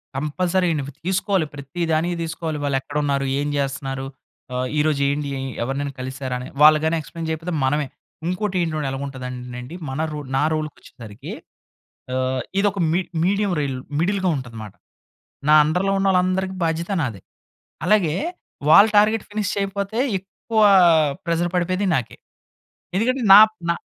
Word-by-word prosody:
Compulsory 175 +5 0 0.4
తీసుకోవాలి. 190 -2 +1
ప్రతి 140 +5 -7
దానికి 170 +3 +1
తీసుకోవాలి. 160 -1 -4
వాళ్ళెక్కడున్నారు? 140 0 -1
ఏం 145 - -1
చేస్తున్నారు? 135 -1 -3 0.5
ఆహ్, 125 0 -1
ఈరోజు 150 -2 +1
ఏండి? 145 0 -2 0.3
ఎవరినైనా 140 +2 -3
కలిసారని. 130 -1 -4
వాళ్ళుగాని 155 +2 +6
ఎక్స్‌ప్లేన్ 165 +1 -7
చేయకపోతే 165 +2 -3
మనమే. 145 +1 0 0.4
ఇంకోటి 190 +2 -2
ఏంటి 165 -2 -1
ఎలాగుంటదంటేనండి 125 0 -6
మన 135 +4 -3
రో 150 - -4 0.2
నా 140 - +2
రోల్‌కి 155 -1 -3
వచ్చేసరికి, 115 +4 -11 0.8
ఆహ్, 130 0 0 0.2
ఇదొక 200 -1 +1
మీ 185 - +2 0.2
మీడియం 200 +1 +1
రైల్ 135 -3 -2 0.2
మిడిల్‌గా 190 +1 +1
ఉంటదనమాట. 110 -5 -8 0.8
నా 155 - +8
అండర్‍లో 180 +6 +1
ఉన్నోళ్ళందరికీ 190 0 +1
బాధ్యత 165 +3 -2
నాదే. 115 -9 -4 0.7
అలాగే 190 -8 +3 0.6
వాళ్ళ 200 +5 +9
టార్గెట్ 215 +1 +4
ఫినిష్ 205 -1 -2
చేయకపోతే 200 +2 -2 0.2
ఎక్కువ 215 +4 -3 0.6
ప్రెషర్ 170 0 0
పడిపోయేది 185 +3 0
నాకే. 125 - -4 0.8
ఎందుకంటే 255 +5 +1
నా 200 - +12 0.3
నా - - +3
155 Hz, 125 wpm, -22 LUFS, 135-190 Hz, 0.8 s, నా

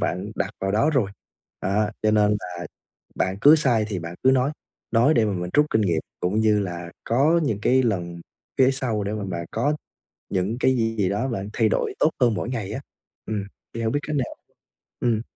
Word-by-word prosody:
bạn - - -2
đặt - - -1
vào 95 0 -1
đó 110 +9 +3
rồi. 125 -10 +1 0.5
Đó, 105 +3 +1
cho 110 - +3
nên 105 -1 +4
là 90 -1 -6 0.5
bạn 95 +1 0
cứ 150 +6 +8
sai 120 -8 +2
thì 100 -4 -2
bạn 85 0 -6
cứ 130 - +6
nói, 130 +2 +2 0.4
nói 120 +7 +4
để 115 -2 +4
mà 105 - 0
mình 90 -1 -3
rút 150 0 +5
kinh 110 - +3
nghiệm 85 -6 +1 0.2
cũng 95 +5 +1
như 105 -1 +3
là 85 -3 -4
có 145 +8 +3
những 105 -6 -1
cái 130 +1 +4
lần 85 -6 -2 0.4
cái 130 0 +5
sau 115 -6 -1
để 100 - -2
mà 105 -2 -3
bạn 85 -3 -4
có 145 +7 0 0.5
những 95 +5 -1
cái 130 0 +3
gì 115 -1 0
gì 95 -3 +2
đó 105 +6 0
bạn 100 -5 -3
thay 110 -2 +2
đổi - - 0
tốt 155 - +5
hơn 120 -3 +4
mỗi 115 - -3
ngày 115 -6 -3
á. - - -4 0.4
Ừm, 105 -2 -2 0.3
thì 115 - -4
hông 110 -1 0
biết 145 - +2
cách 155 - -1
nào 130 -4 -2 0.6
ừm. 115 -3 +1
110 Hz, 220 wpm, -24 LUFS, 95-125 Hz, 0.6 s, cứ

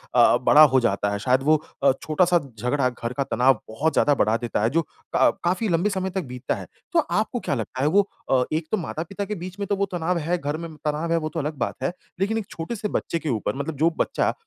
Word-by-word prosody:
अ - - +5
अ, - - +4
बड़ा 150 - +7
हो - - +7
जाता 100 -3 +1
है, 100 - -2
शायद 130 +4 +2
वो 155 +2 +5 0.3
अ, 135 - +6
छोटा-सा 175 +3 +3 0.2
झगडा 125 +2 +1
घर 120 0 -5
का 140 - +2
तनाव 130 -2 +3
बहुत 150 +9 0
ज़्यादा 145 - +4
बढ़ा 110 0 +2
देता 120 -3 -2
है 115 - +3
जो 165 +4 +2
का - - 0
काफ़ी 185 +5 +1
लंबे 175 +5 +2
समय 190 -1 -2
तक 190 - +1
बीतता 125 +1 -3
है। - - -8 0.3
तो - - +5
आपको - - 0
क्या - - -2
लगता 130 - -4
है 145 - +3
वो 200 +4 +3 0.2
अ, 130 -1 +4
एक 155 0 -1
तो 215 - +2
माता-पिता 180 +4 -4
के 210 +1 -4
बीच 185 +3 -8
में 200 - -2
तो 200 - +1
वो 200 0 +1
तनाव 175 0 0
है, 170 +3 0
घर 145 0 -3
में 165 -2 -7
तनाव 155 +3 -1
है, 165 - +3
वो 155 -1 -2
तो 165 - -4
अलग 150 +1 -3
बात - - -2
है। 135 - +1 0.3
लेकिन 215 +3 +1
एक 215 - -3
छोटे-से 210 +6 -4
बच्चे 170 - -2
के 155 - -4
ऊपर 115 +2 -1
मतलब 140 +2 -4
जो 160 +3 +4
बच्चा - - +1
155 Hz, 255 wpm, -24 LUFS, 135-180 Hz, 0.3 s, बड़ा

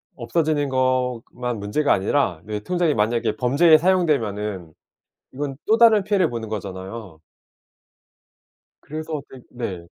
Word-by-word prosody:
없어지는 145 +4 0
것만 125 -2 -1
문제가 105 +9 0
아니라 95 - +1
내 105 0 -4
통장이 175 +4 0
만약에 110 0 0
범죄에 145 +8 +5
사용되면은 110 - 0 0.6
이건 140 0 -4
또 220 - +4
다른 225 -3 +6
피해를 195 -4 +2
보는 115 -2 -5
거잖아요. 95 -2 -7 1.6
그래서 155 0 -5
그 130 - -12
네. 95 -8 -6
125 Hz, 275 characters per minute, -22 LUFS, 105-155 Hz, 1.6 s, 다른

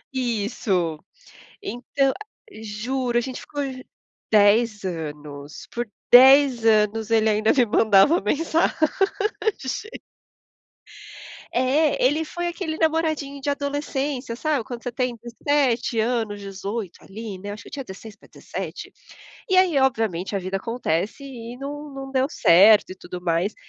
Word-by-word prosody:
Isso 205 -9 -1 0.6
então 270 - -1 0.5
juro, 240 +3 -2
a - - +3
gente 255 +1 -5
ju - - -8
ficou 290 -1 -5 0.7
10 215 +1 +4
anos 150 -4 -7
por 240 0 -3 0.2
10 265 -1 +7
anos 220 0 +2
ele 220 -1 +3
ainda 215 +1 +3
me 250 -3 +3
mandava 215 - +4
mensagem. 330 +2 +1 2.8
É, 275 +5 +2
ele 300 +5 +2
foi 345 +2 -4
aquele 345 -2 -4
namoradinho 315 -3 0
de 285 - -2
adolescência, 280 -3 -3
sabe 295 0 -1
quando 235 +1 -8
você 245 - -3
tem 250 0 -2
17 240 -1 0
anos, 220 -3 -1
18 195 0 -6
ali, 210 0 -8
né, 205 +2 -6
acho 205 - -8
que - - -15
eu - - -28
tinha 280 -2 -5
16 205 0 -11
pra - - -21
17 - - -7 0.6
e 380 - +2
aí, 365 -6 +4
obviamente 220 -8 0
a - - +1
vida 190 +1 -3
acontece 215 - -2
e 240 -3 -8
não 290 +3 -6
não 270 0 -7
deu 265 0 +1
certo 205 - +5
e - - -6
tudo 180 -1 -8
mais, 175 +4 0
235 Hz, 135 wpm, -23 LUFS, 205-275 Hz, 2.8 s, 10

